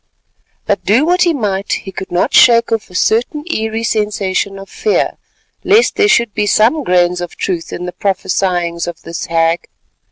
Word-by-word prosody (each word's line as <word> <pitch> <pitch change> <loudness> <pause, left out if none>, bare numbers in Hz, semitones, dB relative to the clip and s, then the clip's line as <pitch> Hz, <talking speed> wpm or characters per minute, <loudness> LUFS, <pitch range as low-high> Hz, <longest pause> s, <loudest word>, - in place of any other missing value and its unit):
But - - -1
do 235 +9 +3
what 360 +2 +1
he 350 - +4
might, 200 -5 -2
he 190 - -5
could 190 - -8
not 175 - 0
shake 235 -1 +5
off 225 -2 -2
a 180 - -14
certain 240 +10 0
eerie 220 -1 -2
sensation 205 -3 -1
of 195 0 -10
fear, 425 - 0 0.5
lest 440 +4 +3
there 415 -1 +3
should 235 - +2
be 210 -1 -1
some 240 +10 +3
grains 180 -3 +1
of 175 - -6
truth 175 -4 -3
in 180 - -5
the 180 - -6
prophesyings 180 -3 -1
of 175 - -7
this 170 - -6
hag. 165 0 0
200 Hz, 180 wpm, -15 LUFS, 180-230 Hz, 0.5 s, shake